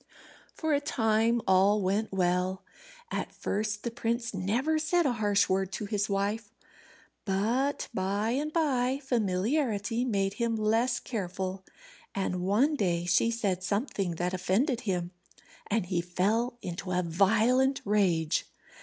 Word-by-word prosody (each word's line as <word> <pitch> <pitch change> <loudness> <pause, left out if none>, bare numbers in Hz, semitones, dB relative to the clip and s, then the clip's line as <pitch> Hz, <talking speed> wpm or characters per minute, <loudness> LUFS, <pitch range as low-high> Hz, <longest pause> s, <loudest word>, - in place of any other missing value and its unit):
For 315 -2 0
a 285 - +2
time 230 -4 +1
all 190 +3 +4
went 200 +3 0
well. 185 0 0 0.5
At - - -3
first 210 0 -2
the 235 - -2
prince 230 0 -2
never 235 +12 0
said 330 +2 +2
a 260 - +2
harsh 205 -3 +2
word 190 0 0
to 210 - -3
his 205 0 -1
wife; 205 +2 -1 0.7
but 230 +8 0
by 200 +4 0
and 290 +5 -1
by 270 -5 +1
familiarity 230 0 0
made 200 -5 0
him 230 -1 +1
less 225 +3 +1
careful, 190 -3 -4 0.5
and 185 -2 -1
one 215 - +2
day 175 -10 0
she 175 +6 +3
said 205 -6 -1
something 195 -2 -1
that 175 +2 -2
offended 215 - +1
him, 175 -2 -1 0.6
and 215 -2 +1
he 180 -1 -1
fell 215 +8 0
into 180 +1 -5
a 180 0 +1
violent 225 +10 +3
rage. 185 -6 +1
210 Hz, 135 wpm, -29 LUFS, 190-240 Hz, 0.7 s, all